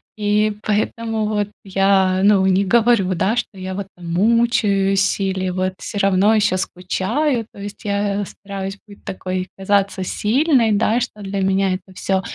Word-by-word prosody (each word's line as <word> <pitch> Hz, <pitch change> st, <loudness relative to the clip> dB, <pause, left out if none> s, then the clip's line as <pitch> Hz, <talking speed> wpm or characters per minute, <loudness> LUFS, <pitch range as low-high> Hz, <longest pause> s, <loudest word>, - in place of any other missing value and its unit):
и 210 Hz, 0 st, +1 dB
поэтому 220 Hz, +1 st, -1 dB
вот 210 Hz, -1 st, -1 dB, 0.2 s
я, 190 Hz, -1 st, +2 dB
ну, 200 Hz, -2 st, +5 dB
не 190 Hz, +1 st, +3 dB
говорю, 225 Hz, -3 st, +3 dB
да, 195 Hz, +6 st, +1 dB
что 240 Hz, -4 st, -3 dB
я 185 Hz, 0 st, -5 dB
вот 195 Hz, 0 st, -5 dB
там 170 Hz, -1 st, -8 dB
мучаюсь 200 Hz, -2 st, +2 dB
или 190 Hz, -1 st, -1 dB
вот 185 Hz, +1 st, -1 dB
всё 205 Hz, -, -6 dB
равно 195 Hz, +2 st, +3 dB
еще 210 Hz, -3 st, +2 dB
скучаю. 220 Hz, +8 st, -1 dB
То -, -, -14 dB
есть 205 Hz, +3 st, -8 dB
я, 200 Hz, -1 st, -1 dB
э, -, -, -3 dB
стараюсь 195 Hz, 0 st, -7 dB
быть 205 Hz, -, -15 dB
такой 185 Hz, 0 st, -4 dB
казаться 195 Hz, 0 st, 0 dB
сильной, 240 Hz, -, +2 dB
да, 220 Hz, +3 st, +2 dB
что 225 Hz, -3 st, -5 dB
для 195 Hz, 0 st, -3 dB
меня 190 Hz, 0 st, +1 dB
это 185 Hz, 0 st, -7 dB
всё, 190 Hz, +1 st, 0 dB
200 Hz, 165 wpm, -20 LUFS, 190-215 Hz, 0.2 s, ну